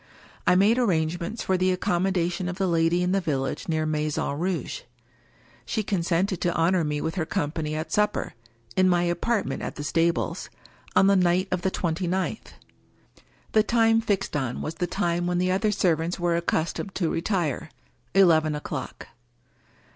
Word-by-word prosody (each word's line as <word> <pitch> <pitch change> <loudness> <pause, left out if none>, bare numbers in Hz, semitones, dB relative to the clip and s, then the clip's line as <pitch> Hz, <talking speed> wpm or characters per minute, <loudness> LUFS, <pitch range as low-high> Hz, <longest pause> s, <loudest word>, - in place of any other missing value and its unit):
I 180 - +6
made 210 +6 +4
arrangements 175 0 0
for 190 - +1
the 185 0 +3
accommodation 180 0 0
of 180 - -5
the 195 - +1
lady 170 0 +2
in 180 - +1
the 195 0 +2
village 135 -6 -2
near 155 -1 0
Maison 155 -2 -1
Rouge. 185 - -2 0.8
She 220 - -2
consented 180 -1 0
to 175 -1 +1
honor 170 +2 +2
me 150 -1 -2
with 160 - -2
her 175 -5 -2
company 155 -3 -2
at 160 +1 -4
supper, 210 +2 0 0.4
in 185 0 +4
my 175 -1 +3
apartment 175 +6 -1
at - - -5
the 145 - -5
stables, 165 +3 0 0.5
on - - +6
the 200 0 +5
night 185 +1 +2
of 185 -1 0
the 190 - +1
twenty 175 -1 -2
ninth. 190 +4 -2 1.0
The 215 - +5
time 225 0 +3
fixed 195 -6 -1
on 130 -5 -2
was 155 - -3
the 175 +2 -2
time 175 -1 -1
when 175 0 0
the 185 +1 +1
other 210 +3 +1
servants 175 -3 0
were 175 -1 +1
accustomed 170 +3 -2
to 170 -4 0
retire 170 - -1 0.2
— - - -39
eleven 160 -5 +5
o'clock. 150 - -6
175 Hz, 170 wpm, -25 LUFS, 165-190 Hz, 1.0 s, I